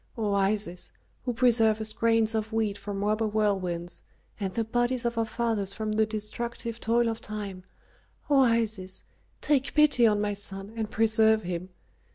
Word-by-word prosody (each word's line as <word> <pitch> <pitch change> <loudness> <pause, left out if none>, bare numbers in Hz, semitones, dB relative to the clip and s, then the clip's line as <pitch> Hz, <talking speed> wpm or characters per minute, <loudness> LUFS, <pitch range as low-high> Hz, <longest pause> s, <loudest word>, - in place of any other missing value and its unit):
O 210 -3 0
Isis, 195 -2 0 0.3
who 245 - -1
preservest 220 -3 +3
grains 225 -1 +2
of 220 0 -2
wheat 220 -2 0
from 200 0 -5
robber 215 +1 +1
whirlwinds, 190 -5 -1 0.4
and 195 -2 -2
the 230 - -1
bodies 240 +2 0
of 235 0 0
our 225 0 +1
fathers 220 -4 0
from 215 -1 -3
the 215 0 +2
destructive 230 +2 -4
toil 235 +1 +2
of 225 0 -3
time, 200 -3 -6 0.6
O 285 -2 +4
Isis, 220 -7 +1 0.4
take 275 -2 +1
pity 295 -6 +5
on 210 -1 +2
my 205 0 0
son 200 0 -4
and 220 -2 -3
preserve 220 -1 +3
him! 180 +1 -4
220 Hz, 160 wpm, -27 LUFS, 205-230 Hz, 0.6 s, pity